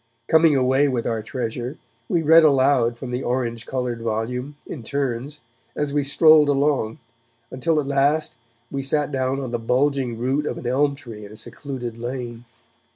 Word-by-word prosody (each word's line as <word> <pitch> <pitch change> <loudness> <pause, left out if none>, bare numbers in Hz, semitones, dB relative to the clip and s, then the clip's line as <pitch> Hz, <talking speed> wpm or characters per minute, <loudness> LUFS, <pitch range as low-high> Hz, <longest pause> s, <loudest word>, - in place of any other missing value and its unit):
Coming 160 -2 +5
away 130 +2 +3
with 125 -4 -1
our 115 -1 -1
treasure, 120 +3 -4 0.3
we 170 -2 +1
read 160 +2 +7
aloud 130 -5 +3
from 125 0 -7
the 125 +1 -2
orange 120 -2 -2
coloured 125 -3 -3
volume, 120 +5 -3
in 145 - -7
turns, 140 +3 -3 0.3
as 145 -1 -2
we 145 - +2
strolled 150 +1 +5
along, 140 -5 +1 0.5
until 155 +5 0
at 145 - -2
last 140 +1 +1 0.4
we 140 - -2
sat 145 +2 0
down 130 0 -1
on 130 -3 -5
the 120 - -1
bulging 130 0 0
root 135 +5 -1
of - - -3
an - - -8
elm 140 +3 +1
tree 115 -6 -10
in 100 - -10
a 105 - -11
secluded 120 0 -6
lane. 120 -1 -5
130 Hz, 170 wpm, -22 LUFS, 120-145 Hz, 0.5 s, read